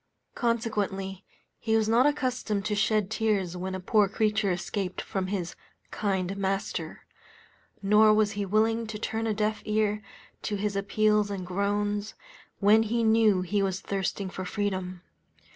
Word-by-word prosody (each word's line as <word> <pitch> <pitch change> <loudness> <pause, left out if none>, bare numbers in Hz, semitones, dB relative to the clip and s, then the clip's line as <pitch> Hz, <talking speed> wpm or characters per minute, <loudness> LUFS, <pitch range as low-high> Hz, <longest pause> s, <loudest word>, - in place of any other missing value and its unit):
Consequently, 205 -5 -2 0.4
he 220 -1 0
was 220 -1 +1
not 235 +5 +4
accustomed 255 -8 -1
to 210 - 0
shed 210 -1 +1
tears 210 -6 0
when 185 +1 -4
a - - -4
poor 205 +2 +3
creature 210 -1 +1
escaped 180 +1 -3
ftom 190 -1 -3
his 185 -4 -3 0.4
"kind 195 -2 -1
master;" 195 0 -3 0.8
nor 210 +2 +6
was 215 -1 +3
he 205 -2 -3
willing 220 +3 +1
to 215 0 -5
turn 225 +1 -2
a 220 - +1
deaf 215 0 -1
ear 210 0 0 0.4
to 210 - -2
his 205 0 -2
appeals 210 +1 +2
and 195 -2 -4
groans, 205 +2 -1 0.4
when 210 +2 +5
he 230 +1 0
knew 220 -4 +4
he 200 +3 0
was 190 -1 -1
thirsting 195 0 -2
for 185 - -5
freedom. 185 -2 -3
205 Hz, 150 wpm, -28 LUFS, 195-220 Hz, 0.8 s, nor